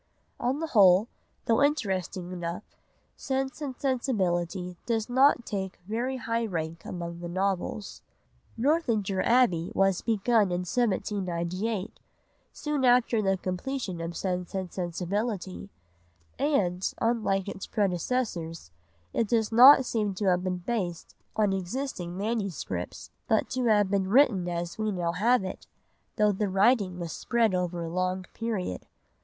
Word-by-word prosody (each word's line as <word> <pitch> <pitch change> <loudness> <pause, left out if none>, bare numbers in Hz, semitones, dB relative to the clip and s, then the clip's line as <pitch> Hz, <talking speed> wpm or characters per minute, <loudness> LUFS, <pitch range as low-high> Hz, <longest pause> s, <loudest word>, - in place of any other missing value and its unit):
On 255 +4 0
the 325 - -1
whole, 195 - +6 0.4
though 230 +2 +3
interesting 190 - 0
enough, 175 +2 -4 0.5
Sense 265 +2 -3
and 275 -3 -4
Sensibility 185 - -1
does 225 -2 0
not 260 0 +4
take 190 -2 -4
very 245 +5 -2
high 230 -1 -1
rank 165 -3 -4
among 170 -1 -5
the 175 0 -6
novels. 195 +2 -2 0.6
Northanger 230 - +1
Abbey 230 -9 +3
was 195 -1 +2
begun 220 -2 +2
in 175 0 0
1798, 195 -1 -1 0.5
soon 300 -3 -2
after 245 -2 +4
the 195 -1 +1
completion 185 +1 -4
of 165 0 -4
Sense 180 -1 -3
and 190 -2 -4
Sensibility, 190 +3 -3 0.7
and, 195 -11 +1
unlike 215 -5 +1
its 195 -1 -6
predecessors, 180 - -2 0.4
it 230 - +1
does 225 -1 +1
not 260 +3 +9
seem 210 -5 -1
to 205 - -2
have 180 -1 +2
been 185 -1 -1
based 185 -8 -3 0.2
on 210 -2 +2
existing 185 -2 -4
MSS., 195 - -3 0.2
but - - +1
to 255 -1 -1
have 210 -3 +3
been 195 -2 +1
written 210 -7 +4
as 175 +2 -4
we 215 -1 0
now 175 -3 -1
have 220 +6 +2
it, 185 - -7 0.5
though 210 -1 +3
the 200 +1 -1
writing 195 -1 +3
was 170 -2 -5
spread 230 -4 +1
over 180 -1 -1
a - - -4
long 185 +2 -1
period. 215 - -3
195 Hz, 135 wpm, -28 LUFS, 180-235 Hz, 0.7 s, not